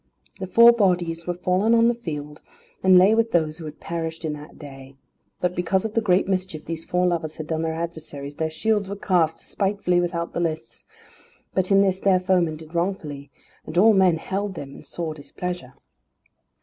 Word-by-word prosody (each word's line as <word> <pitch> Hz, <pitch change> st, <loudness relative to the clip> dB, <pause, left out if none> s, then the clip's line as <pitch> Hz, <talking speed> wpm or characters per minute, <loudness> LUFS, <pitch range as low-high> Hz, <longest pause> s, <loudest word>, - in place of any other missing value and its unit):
The 190 Hz, -, -4 dB
four 235 Hz, +6 st, +8 dB
bodies 175 Hz, -7 st, 0 dB
were 175 Hz, -, -1 dB
fallen 185 Hz, +6 st, +2 dB
on 230 Hz, 0 st, +5 dB
the 240 Hz, -, +3 dB
field, 150 Hz, -9 st, -7 dB, 0.4 s
and 185 Hz, -1 st, +6 dB
lay 190 Hz, +4 st, +6 dB
with 230 Hz, 0 st, +2 dB
those 160 Hz, -1 st, 0 dB
who 165 Hz, -, -7 dB
had 150 Hz, 0 st, -9 dB
perished 165 Hz, -1 st, -4 dB
in 155 Hz, -, -2 dB
that 150 Hz, 0 st, -11 dB
day. 135 Hz, -2 st, -11 dB, 0.4 s
But 180 Hz, 0 st, -1 dB
because 180 Hz, +3 st, 0 dB
of 220 Hz, -, -3 dB
the 230 Hz, -, +2 dB
great 185 Hz, -3 st, +2 dB
mischief 185 Hz, -5 st, -2 dB
these 165 Hz, 0 st, -5 dB
four 180 Hz, 0 st, +1 dB
lovers 165 Hz, -3 st, -1 dB
had 155 Hz, -, -6 dB
done 160 Hz, 0 st, -2 dB
their 160 Hz, 0 st, -2 dB
adversaries, 155 Hz, -4 st, -6 dB
their 160 Hz, 0 st, -1 dB
shields 205 Hz, +4 st, 0 dB
were 200 Hz, -, -4 dB
cast 175 Hz, -5 st, +1 dB
despitefully 195 Hz, -3 st, 0 dB
without 170 Hz, -1 st, -3 dB
the -, -, -2 dB
lists; 155 Hz, -9 st, -4 dB, 0.7 s
but 185 Hz, -1 st, 0 dB
in 195 Hz, -1 st, +5 dB
this 190 Hz, -1 st, +1 dB
their 190 Hz, -2 st, +3 dB
foemen 180 Hz, -3 st, +1 dB
did 155 Hz, +1 st, -13 dB
wrongfully, 170 Hz, -6 st, -3 dB, 0.4 s
and 175 Hz, -, -5 dB
all 215 Hz, +4 st, +7 dB
men 185 Hz, -4 st, +4 dB
held 195 Hz, +4 st, -3 dB
them 140 Hz, -3 st, -8 dB
in -, -, -12 dB
sore 165 Hz, -2 st, -4 dB
displeasure. 155 Hz, -1 st, -6 dB
175 Hz, 195 wpm, -23 LUFS, 160-190 Hz, 0.7 s, four